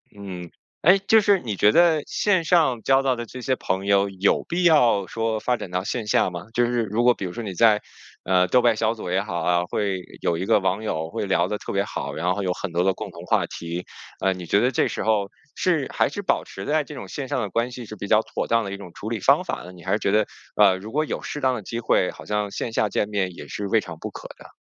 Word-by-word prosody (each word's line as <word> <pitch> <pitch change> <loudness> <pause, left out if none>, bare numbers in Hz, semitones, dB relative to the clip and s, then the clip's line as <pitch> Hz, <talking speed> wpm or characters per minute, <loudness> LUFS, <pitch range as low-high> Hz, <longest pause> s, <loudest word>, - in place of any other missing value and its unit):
嗯， 95 -4 -8 0.3
诶， 185 +5 +6
就 210 +3 +5
是 205 -2 +3
你 110 -9 -4
觉 105 - +5
得 165 0 +4
线 190 -5 +1
上 155 -9 +3
交 135 +2 +3
到 135 -2 +1
的 120 - -4
这 125 +2 -9
些 130 +1 0
朋 95 +1 -2
友 100 0 +3
有 95 +1 +1
必 175 +2 -1
要 125 - +4
说 115 +3 -1
发 125 -1 +1
展 95 - -7
到 90 +1 -2
线 110 +2 -3
下 100 - +3
吗？ 90 0 -7
就 120 0 +3
是 120 -1 0
如 110 +3 -1
果 125 0 +6
比 100 - -6
如 90 - -5
说 120 - -5
你 100 -3 -5
在， 105 +2 +4 0.4
呃， 90 -1 +3
豆 125 +7 +4
瓣 120 -2 +3
小 110 +1 +1
组 110 -6 -7
也 95 +1 +2
好 90 -4 -4
啊， 90 +1 +2
会 95 0 -2 0.2
有 85 - 0
一 90 - -3
个 - - +4
网 95 +2 0
友， 80 -6 -2
会 95 - -3
聊 90 -3 +2
得 105 - -2
特 - - -6
别 100 0 +1
好， - - -5
然 90 +3 0
后 100 - -3
有 90 -1 0
很 95 0 -5
多 85 +1 +1
的 95 - +3
共 - - -7
同 - - -10
话 - - +2
题。 85 +1 -6 0.4
呃， 95 - +3
你 90 -1 -8
觉 100 - +3
得 125 - +2
这 - - +2
时 - - -4
候， 105 -3 +1 0.3
是 165 -7 0
还 - - +2
是 205 - -5
保 200 - +1
持 - - -8
在 150 +1 +1
这 150 - -9
种 130 - -8
线 140 -2 -5
上 130 - -1
的 105 - -3
关 115 +5 0
系 125 -1 -8
是 110 - -9
比 100 - -5
较 110 +1 +4
妥 - - -4
当 115 0 +2
的 100 - -5
一 - - -5
种 95 -3 -10
处 110 - -6
理 115 -1 -2
方 - - +4
法 - - -4
呢？ 90 - -10
你 90 -1 -14
还 95 - -3
是 105 - +2
觉 100 - 0
得， 105 +1 +3 0.3
啊， 100 -2 +6
如 100 +4 -8
果 155 +2 +2
有 - - -4
适 150 - -5
当 130 -1 +2
的 110 - -5
机 115 +4 -4
会， 95 - +2
好 - - -12
像 105 -1 -1
线 115 - -4
下 110 -1 +1
见 105 - -1
面 95 -3 -1
也 - - -9
是 100 - -4
未 110 +2 +3
尝 85 -5 -9
不 - - -5
可 - - -9
的？ - - -13
105 Hz, 305 characters per minute, -23 LUFS, 95-125 Hz, 0.4 s, 诶